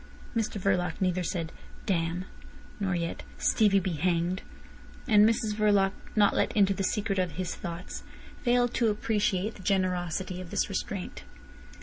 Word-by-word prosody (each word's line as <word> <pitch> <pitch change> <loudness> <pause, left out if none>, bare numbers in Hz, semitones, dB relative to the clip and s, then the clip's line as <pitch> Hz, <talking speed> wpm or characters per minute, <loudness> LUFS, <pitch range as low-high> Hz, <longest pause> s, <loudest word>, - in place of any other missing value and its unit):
Mr 220 -2 -1
Verloc 180 -3 +1
neither 185 -2 +1
said, 165 -2 -2 0.3
"Damn!" 175 -1 0 0.5
nor 190 -3 0
yet 170 -1 -2 0.2
"Stevie 205 -3 +4
be 185 0 -2
hanged!" 175 +2 0 0.7
And 210 -2 +7
Mrs 220 -2 0
Verloc, 205 -2 +3 0.2
not 205 -2 +4
let - - +2
into 200 -1 +5
the 195 - -2
secret 200 0 0
of 180 -3 0
his 180 +2 -3
thoughts, 170 0 -6 0.4
failed 245 0 +2
to 230 -3 +2
appreciate 210 -1 0
the - - -12
generosity 185 -1 0
of 180 - -9
this - - 0
restraint. 195 -1 -4
190 Hz, 145 wpm, -29 LUFS, 180-210 Hz, 0.7 s, And